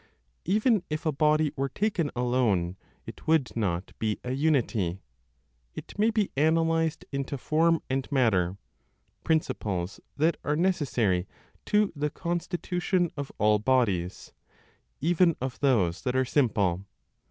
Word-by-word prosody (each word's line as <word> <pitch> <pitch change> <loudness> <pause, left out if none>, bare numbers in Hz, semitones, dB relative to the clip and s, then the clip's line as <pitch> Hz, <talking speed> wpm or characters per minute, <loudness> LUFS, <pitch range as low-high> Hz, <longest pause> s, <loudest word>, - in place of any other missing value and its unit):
Even 215 +3 +3
if 155 +2 -3
a 155 - +2
body 150 +1 +2
were 135 0 -1
taken 190 -6 0
alone, 120 -8 +1 0.3
it - - -11
would 155 -6 +2
not 95 -5 -2
be 110 -1 -1
a 125 - -4
unity; 125 - +1 0.8
it - - -8
may 215 +2 +4
be 215 -3 0
analyzed 165 +2 +1
into 140 0 -3
form 165 +4 +2
and 135 +1 -2
matter, 100 -9 +2 0.7
principles 105 - -1 0.2
that 160 +3 +2
are 150 - 0
necessary 125 - +1 0.4
to 210 -2 +2
the 150 +1 -1
constitution 175 +2 -1
of 140 -1 -5
all 105 0 +3
bodies, 105 -7 0 0.7
even 170 +1 +3
of 130 0 -4
those 100 -11 +2
that 125 -1 -2
are 130 0 +2
simple. 105 - +1
140 Hz, 130 wpm, -27 LUFS, 110-165 Hz, 0.8 s, may